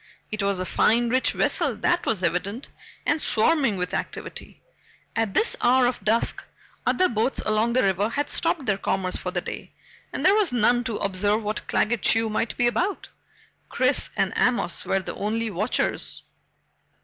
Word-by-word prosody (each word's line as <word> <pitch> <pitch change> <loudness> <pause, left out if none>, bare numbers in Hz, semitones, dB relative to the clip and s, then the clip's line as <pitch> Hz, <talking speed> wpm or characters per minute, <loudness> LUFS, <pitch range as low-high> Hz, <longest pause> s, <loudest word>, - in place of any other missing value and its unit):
It 215 -1 -2
was 200 -1 0
a 185 - -2
fine, 235 +5 +2
rich 260 +2 +2
vessel, - - +1
that 350 0 0
was 200 -5 0
evident, 190 - -2 0.4
and 300 +1 +1
swarming 255 -2 +2
with 180 0 -3
activity. - - -6 0.6
At 225 -3 -1
this 455 - +3
hour 250 +1 +4
of 245 0 -1
dusk, 225 +2 0 0.4
other 370 - +3
boats 230 +3 -1
along 215 +2 +1
the 255 - +3
river 195 +2 +1
had 290 +4 -2
stopped 290 -6 0
their 195 -3 0
commerce 185 -1 -1
for 180 - -3
the 180 -1 -2
day - - -8 0.4
and - - -4
there 385 - +7
were 425 0 +4
none 240 +1 +3
to 230 -4 -2
observe 205 +3 0
what 210 +1 -4
Claggett 225 -1 +1
Chew 225 -1 +2
might 215 +1 -2
be 245 - +2
about. 360 +11 -1 0.6
Chris - - +1
and - - +1
Amos 235 -8 +1
were 195 - +1
the - - -6
only 220 +2 -2
watchers. 210 +6 -2
225 Hz, 175 wpm, -24 LUFS, 200-245 Hz, 0.6 s, there